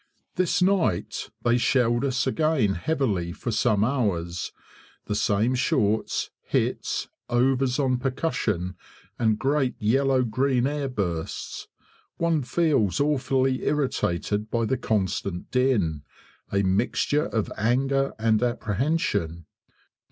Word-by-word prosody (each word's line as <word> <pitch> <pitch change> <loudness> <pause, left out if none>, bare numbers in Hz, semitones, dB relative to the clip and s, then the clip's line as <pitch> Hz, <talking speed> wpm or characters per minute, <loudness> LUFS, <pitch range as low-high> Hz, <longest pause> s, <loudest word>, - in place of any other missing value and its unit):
This 185 0 +1
night 180 - 0
they 120 0 +3
shelled 120 -1 +2
us 130 -1 0
again 140 -7 +2
heavily 95 - -1
for 120 - -4
some 105 -2 +2
hours 100 -9 -1 0.5
the - - -2
same 105 +4 +1
shorts, 110 -4 0
hits, - - -1 0.2
overs 130 +1 +2
on 130 -3 +1
percussion, 110 - -1 0.4
and 110 -3 +2
great 135 +1 +1
yellow 130 +4 +2
green 130 +1 +1
air 145 -1 -1
bursts. 90 -9 -4 0.5
One 170 -2 +1
feels 125 - +1
awfully 135 -2 +1
irritated 105 - -1
by 115 0 0
the 130 - +1
constant 95 -3 -2
din 110 - +1 0.5
a 100 0 +2
mixture 115 - +1
of 110 -3 -2
anger 135 +5 +1
and 110 -1 +2
apprehension. 110 - -1
120 Hz, 110 wpm, -25 LUFS, 105-135 Hz, 0.5 s, they